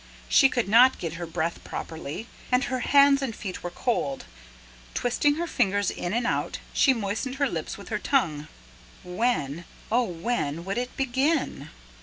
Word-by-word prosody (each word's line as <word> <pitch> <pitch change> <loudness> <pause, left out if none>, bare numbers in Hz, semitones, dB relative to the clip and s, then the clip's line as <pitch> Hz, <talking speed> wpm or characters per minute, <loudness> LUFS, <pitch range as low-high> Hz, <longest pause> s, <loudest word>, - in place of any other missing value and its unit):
She 270 - +6
could 240 -5 -1
not 240 +5 +6
get 165 -2 -4
her 170 - -4
breath 165 0 -3
properly, 160 +5 -6 0.3
and 250 +1 +3
her 255 -1 -2
hands 280 +1 +5
and 245 -5 -3
feet 185 -3 -6
were 175 - -4
cold. 175 - -2 0.7
Twisting 290 +4 +2
her 340 +2 -2
fingers, 205 - +1
in 175 - -4
and 235 +3 0
out, - - -1 0.2
she 270 - +5
moistened 230 +3 -2
her 280 0 +1
lips - - -4
with - - -11
her - - -1
tongue. 155 - 0 0.6
When, 180 - -1 0.3
oh, 245 +2 +3
when 170 -4 -2
would 195 +5 -1
it 250 0 -5
begin? 270 +5 0
230 Hz, 165 wpm, -26 LUFS, 175-260 Hz, 0.7 s, She